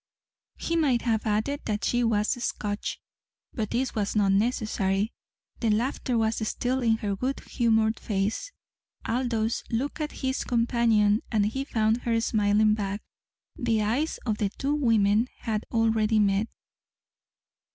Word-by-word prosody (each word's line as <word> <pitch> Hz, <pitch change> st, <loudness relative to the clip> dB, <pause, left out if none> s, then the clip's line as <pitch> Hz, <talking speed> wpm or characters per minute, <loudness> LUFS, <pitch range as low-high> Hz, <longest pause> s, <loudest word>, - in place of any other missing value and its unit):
He 335 Hz, -, -2 dB
might 275 Hz, -8 st, +2 dB
have 225 Hz, -2 st, 0 dB
added 220 Hz, +8 st, 0 dB
that 210 Hz, -1 st, -2 dB
she 245 Hz, 0 st, +1 dB
was 215 Hz, -2 st, +1 dB
Scotch. 205 Hz, 0 st, -3 dB, 0.5 s
But 215 Hz, -4 st, -2 dB
this 255 Hz, +2 st, -1 dB
was 210 Hz, -1 st, -2 dB
not 200 Hz, -2 st, +3 dB
necessary. 205 Hz, -1 st, 0 dB, 0.5 s
The 230 Hz, -, +1 dB
laughter 240 Hz, +3 st, 0 dB
was 225 Hz, 0 st, +1 dB
still 255 Hz, +4 st, -1 dB
in 225 Hz, -2 st, +3 dB
her 205 Hz, -2 st, -2 dB
good 260 Hz, +7 st, -2 dB
humoured 220 Hz, -2 st, +1 dB
face. 210 Hz, -, -2 dB, 0.5 s
Aldous 230 Hz, -2 st, -1 dB
looked 270 Hz, +7 st, -2 dB
at 300 Hz, -, -2 dB
his 260 Hz, 0 st, 0 dB
companion, 230 Hz, -3 st, +2 dB
and 210 Hz, -3 st, +2 dB
he 265 Hz, +6 st, -2 dB
found 220 Hz, -4 st, +1 dB
her 230 Hz, -1 st, +1 dB
smiling 215 Hz, -1 st, +3 dB
back. 205 Hz, -1 st, -3 dB, 0.5 s
The 225 Hz, -3 st, 0 dB
eyes 255 Hz, +10 st, 0 dB
of 215 Hz, -3 st, -1 dB
the 205 Hz, -, +1 dB
two 275 Hz, +8 st, -2 dB
women 225 Hz, -5 st, +3 dB
had 220 Hz, -2 st, -2 dB
already 225 Hz, -1 st, +2 dB
met. 205 Hz, +1 st, +2 dB
225 Hz, 140 wpm, -27 LUFS, 210-240 Hz, 0.5 s, not